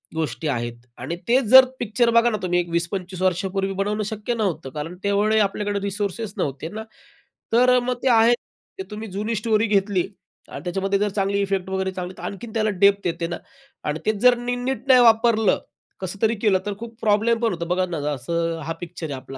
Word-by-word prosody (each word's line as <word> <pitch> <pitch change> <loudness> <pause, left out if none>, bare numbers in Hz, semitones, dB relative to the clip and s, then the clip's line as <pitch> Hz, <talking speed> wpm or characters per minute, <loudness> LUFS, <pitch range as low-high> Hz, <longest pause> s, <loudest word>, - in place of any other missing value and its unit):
गोष्टी 160 0 -2
आहेत. 120 -3 -2 0.2
आणि 145 +8 -4
तो 255 +2 +5
जर 260 0 +10
पिक्चर 235 +1 +1
बघा 240 +1 +3
ना 215 - -1
तुम्ही, 175 -1 +1
एक 175 -1 -2
20-25 180 +2 -3
वर्षांपूर्वी 190 +1 0
बनवणं 205 +2 -1
शक्य 215 +3 -3
नव्हतं 190 -11 -2
कारण 155 +5 -6
तेवढे 205 +2 +2
आपल्याकडे 205 0 0
रिसोर्सेस 200 +1 -3
नव्हते 140 +4 -3
ना, 220 +2 -6 0.7
तर 250 +2 +5
अ, - - +4
मग 250 +1 -1
ते 265 - +3
आहे. 230 0 +6 0.5
ते - - -2
तुम्ही 215 +1 -6
जुनी 215 +4 -2
स्टोरी 215 +1 +1
घेतली 200 -2 +2 0.5
आणि - - -8
त्याच्यामध्ये 195 +2 -1
जर 210 0 +1
चांगले 200 0 0
इफेक्ट्स 195 -1 -1
वगैरे 190 0 -1
दिले, 180 0 -6
तर - - -10
आणखीन 220 +3 -6
त्याला 215 -1 +1
डेप्थ 200 -2 +4
येते 170 0 -2
ना. 175 - -4 0.5
आणि 150 +2 -2
ते 215 - +4
जर 250 0 +5
नी 245 +1 -2
नीट 255 +1 -3
नाही 255 -1 +7
वापरलं, 225 -2 +4 0.4
कसं 190 +2 -6
तरी 225 +1 +3
केलं 200 -4 +3
तर 205 - -2
खूप 230 0 -9
प्रॉब्लेम 220 +2 +2
पण 230 - +2
होतो. 170 0 -4
बघा 180 +2 0
ना, 170 - -3 0.2
असं 165 +5 -2
हा 165 - -2
पिक्चर 170 -1 -6
आहे 145 - -5
आपला 130 +1 -9
200 Hz, 205 wpm, -23 LUFS, 180-225 Hz, 0.7 s, जर